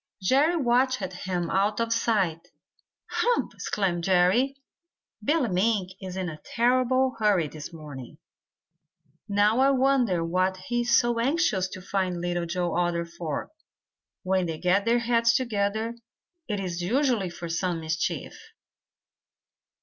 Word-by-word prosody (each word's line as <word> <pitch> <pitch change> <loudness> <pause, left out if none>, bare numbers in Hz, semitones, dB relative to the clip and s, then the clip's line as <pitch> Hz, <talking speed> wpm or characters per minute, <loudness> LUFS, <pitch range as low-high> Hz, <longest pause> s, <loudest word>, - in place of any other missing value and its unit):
Jerry 275 - +3
watched 255 -1 +2
him 180 -3 -3
out 205 +3 +1
of 230 0 +1
sight. 195 -8 0 0.6
"Hump!" 485 0 +1
exclaimed 180 -4 -2
Jerry. 190 +10 +3 0.7
"Billy 295 +1 +2
Mink 190 0 +1
is 185 -1 -6
in 185 -1 -2
a 155 -2 -7
terrible 255 +2 +2
hurry 200 -7 +3
this 150 +1 -9
morning. 145 -6 -10 1.1
Now 205 +3 +3
I 270 +1 +5
wonder 255 -10 +2
what 185 +2 0
he 240 +6 -2
is 235 0 +4
so 240 -1 0
anxious 250 - +1
to 185 - -9
find 185 -2 -1
Little 175 0 -2
Joe 175 0 -1
Otter 175 -1 0
for. 165 -3 -5 0.7
When 185 -1 +1
they 160 -1 -4
get 185 +4 +2
their 235 +1 +3
heads 230 0 +2
together, 220 -2 -1 0.5
it 210 -3 -2
is 180 -2 -3
usually 235 -1 +1
for 170 0 -7
some 170 +1 -1
mischief." 160 +1 -2
195 Hz, 135 wpm, -26 LUFS, 175-240 Hz, 1.1 s, I